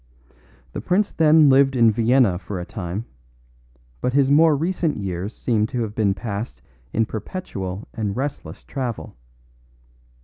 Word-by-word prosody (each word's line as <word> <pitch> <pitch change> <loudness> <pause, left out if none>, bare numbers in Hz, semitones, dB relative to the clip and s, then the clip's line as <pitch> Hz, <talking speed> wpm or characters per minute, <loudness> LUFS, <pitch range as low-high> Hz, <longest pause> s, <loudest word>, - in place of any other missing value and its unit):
The - - -4
prince 195 +3 +1
then 155 -1 +5
lived 135 0 +5
in 115 -2 +5
Vienna 115 -4 +3
for 95 -1 -6
a 90 - -5
time, 95 +3 -5 1.0
but 125 - 0
his 140 0 +3
more 155 +1 +6
recent 165 0 -1
years 95 0 -4
seemed 110 -2 0
to 125 -4 -2
have 105 -2 -5
been 100 -3 +1
passed 100 - -5 0.3
in 115 - +1
perpetual 105 - -6
and 105 -2 -3
restless 140 +2 -5
travel. 125 - -5
115 Hz, 140 wpm, -22 LUFS, 100-140 Hz, 1.0 s, more